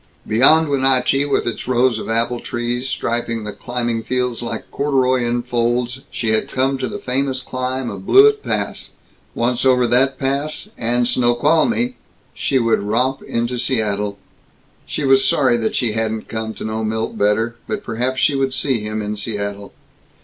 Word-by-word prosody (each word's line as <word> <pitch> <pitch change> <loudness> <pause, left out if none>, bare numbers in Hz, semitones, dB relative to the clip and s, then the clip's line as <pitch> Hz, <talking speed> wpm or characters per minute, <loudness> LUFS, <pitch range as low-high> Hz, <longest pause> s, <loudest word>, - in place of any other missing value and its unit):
Beyond 155 +8 +5
Wenatchee, 135 0 +2
with 140 - 0
its 120 - -4
rows 125 -2 +2
of - - -6
apple 115 +2 0
trees 120 +2 -3
striping 115 -2 -2
the 105 - -5
climbing 120 0 -3
fields 125 0 -1
like 120 - -5
corduroy 130 -3 +1
in 120 0 -1
folds, 120 +1 -1
she 115 - -2
had 110 0 +1
come 135 +1 0
to 130 - -1
the - - -5
famous 130 +1 -1
climb 130 0 -3
of 195 - -7
Blewett 425 +1 +6
Pass. - - -3 0.5
Once 120 +1 0
over 125 -2 +4
that 130 +3 +2
pass, 140 +9 -2
and 120 +1 +1
Snoqualmie, 150 - +2 0.4
she 135 - 0
would 115 -4 +2
romp 125 +6 0
into 120 +1 -2
Seattle. 105 -5 -1 0.7
She - - -3
was 135 -1 +5
sorry 130 -4 +3
that 110 -1 -1
she 120 -3 +1
hadn't 110 0 -2
come 110 -1 -4
to - - -7
know 110 0 -2
Milt 110 +1 -2
better, 110 +3 +1
but 210 -1 -3
perhaps 125 - -2
she 140 - +3
would 135 -1 0
see 130 -5 0
him 105 0 -4
in 105 +1 -3
Seattle. 100 -1 -4
125 Hz, 165 wpm, -19 LUFS, 115-130 Hz, 0.7 s, Blewett